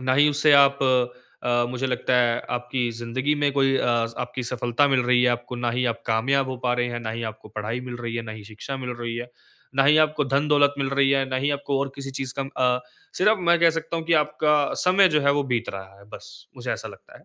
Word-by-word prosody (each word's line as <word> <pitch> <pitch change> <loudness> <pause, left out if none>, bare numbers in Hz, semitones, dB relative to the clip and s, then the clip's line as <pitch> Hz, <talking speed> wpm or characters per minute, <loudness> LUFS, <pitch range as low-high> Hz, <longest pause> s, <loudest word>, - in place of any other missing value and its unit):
ना 130 0 +1
ही 145 +2 +5
उससे 150 +1 +3
आप 140 -1 +6 0.6
अ, 120 0 +1
मुझे 125 +1 -2
लगता 125 0 -1
है 120 -1 +2
आपकी 125 0 -2
ज़िंदगी 120 +5 -2
में 145 -1 +1
कोई 135 -1 +2
अ, - - 0 0.3
आपकी 125 +1 -4
सफलता 120 +3 0
मिल 135 -2 +2
रही 125 0 +3
है 125 - +4
आपको, 120 +1 -4
ना 120 0 -1
ही 125 +2 -1
आप 115 0 -18
कामयाब 130 +4 +1
हो 130 - -4
पा 120 - +2
रहे 120 0 0
हैं, 120 0 -5
ना 110 -1 -4
ही 115 +1 -5
आपको 110 0 -17
पढ़ाई 110 +3 -4
मिल 125 -1 -7
रही 120 -1 -5
है, 120 - -3
ना 110 -1 -8
ही 110 -1 -10
शिक्षा 110 +6 -7
मिल 125 -2 -5
रही 120 -1 -4
है, 120 +1 -6 0.4
ना 135 - +3
ही 145 +2 +5
आपको 155 -1 -2
धन-दौलत 145 +1 +2
मिल 135 -1 -1
रही 140 0 +2
है, 135 -1 +2
ना 130 - -2
ही 140 +3 0
आपको 140 -1 -2
और 135 -1 -3
किसी 135 -1 -7
चीज़ 130 -2 -4
का - - +1 0.3
अ, - - -6 0.4
सिर्फ़ 215 +3 +3
मैं 170 0 +5
कह 170 -1 +6
सकता 165 +1 -4
हूँ 165 - -4
कि 165 - +1
आपका 150 -1 +1
समय 185 +1 +5
जो 150 -3 +2
है 140 0 +3
वो 145 0 +1
बीत 120 0 -2
रहा 95 0 -10
है 100 - -17
बस, - - -13
मुझे - - -5
ऐसा - - -6
लगता - - -15
है। - - -24
130 Hz, 260 wpm, -24 LUFS, 120-145 Hz, 0.6 s, आप